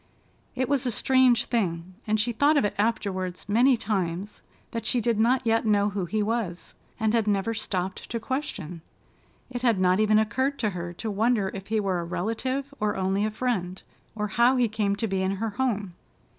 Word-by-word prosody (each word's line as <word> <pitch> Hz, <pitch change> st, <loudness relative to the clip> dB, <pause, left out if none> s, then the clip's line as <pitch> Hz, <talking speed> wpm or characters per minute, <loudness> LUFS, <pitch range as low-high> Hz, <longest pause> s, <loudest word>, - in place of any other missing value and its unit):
It 260 Hz, 0 st, 0 dB
was 270 Hz, -1 st, +1 dB
a -, -, +1 dB
strange 255 Hz, 0 st, +4 dB
thing—and 190 Hz, +1 st, -2 dB
she 235 Hz, +3 st, +1 dB
thought 290 Hz, +6 st, +3 dB
of 250 Hz, -, +3 dB
it 205 Hz, -, -1 dB
afterward 195 Hz, -5 st, -1 dB
many 240 Hz, +5 st, +4 dB
times—that 200 Hz, +3 st, -4 dB
she 245 Hz, -, +2 dB
did 230 Hz, -1 st, +1 dB
not 245 Hz, +3 st, +3 dB
yet 225 Hz, 0 st, +2 dB
know 205 Hz, -2 st, +3 dB
who 195 Hz, -2 st, -2 dB
he 210 Hz, +4 st, -1 dB
was, 210 Hz, -5 st, -3 dB, 0.3 s
and 220 Hz, -1 st, +1 dB
had 225 Hz, -2 st, +2 dB
never 205 Hz, +2 st, +1 dB
stopped 190 Hz, -3 st, -3 dB
to 230 Hz, -, -2 dB
question. 215 Hz, -, -4 dB, 0.7 s
It 245 Hz, -1 st, -4 dB
had 235 Hz, -6 st, +2 dB
not 185 Hz, +1 st, +3 dB
even 215 Hz, 0 st, +4 dB
occurred 260 Hz, +6 st, +1 dB
to 215 Hz, -3 st, 0 dB
her 175 Hz, -1 st, -5 dB
to 215 Hz, +5 st, -4 dB
wonder 210 Hz, -1 st, +1 dB
if 195 Hz, 0 st, -7 dB
he 220 Hz, 0 st, +1 dB
were 190 Hz, -3 st, 0 dB
a -, -, -3 dB
relative 230 Hz, +11 st, -3 dB
or 210 Hz, 0 st, 0 dB
only 190 Hz, +2 st, +1 dB
a -, -, 0 dB
friend, 210 Hz, -6 st, -2 dB, 0.4 s
or 210 Hz, -1 st, -2 dB
how 240 Hz, +5 st, +4 dB
he 245 Hz, -2 st, +3 dB
came 210 Hz, -2 st, 0 dB
to 225 Hz, +2 st, -2 dB
be 190 Hz, -2 st, -1 dB
in 190 Hz, +1 st, 0 dB
her 220 Hz, +3 st, -2 dB
home. 210 Hz, -6 st, -1 dB
215 Hz, 195 wpm, -26 LUFS, 195-235 Hz, 0.7 s, strange